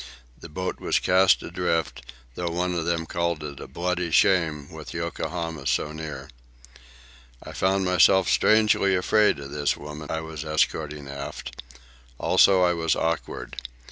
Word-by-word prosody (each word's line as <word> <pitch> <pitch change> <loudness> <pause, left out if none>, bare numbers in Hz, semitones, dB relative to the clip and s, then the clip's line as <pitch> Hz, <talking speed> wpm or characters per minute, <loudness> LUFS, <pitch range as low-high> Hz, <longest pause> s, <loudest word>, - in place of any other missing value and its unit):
The - - -12
boat 90 +5 -4
was - - +1
cast 95 +1 +4
adrift, 85 -3 -2 0.3
though 85 +5 -3
one 90 +2 -1
of 85 -2 -2
them 85 -1 -1
called 85 -1 -2
it 70 -2 -7
a - - -8
"bloody 90 0 -2
shame" 80 -4 +2
with - - -9
Yokohama 80 -5 -4
so 75 - 0
near. 80 -1 -7 1.2
I - - -9
found 95 +1 +1
myself 90 +1 +4
strangely 105 -3 +3
afraid 105 +2 +3
of 70 -1 -9
this 75 0 0
woman 75 +1 -9
I 80 - -2
was 80 -1 -7
escorting 75 -2 -1
aft. 70 -3 -7 0.6
Also 95 -2 +4
I 90 -1 +3
was 80 -2 0
awkward. 80 -5 -3
85 Hz, 145 wpm, -25 LUFS, 75-90 Hz, 1.2 s, cast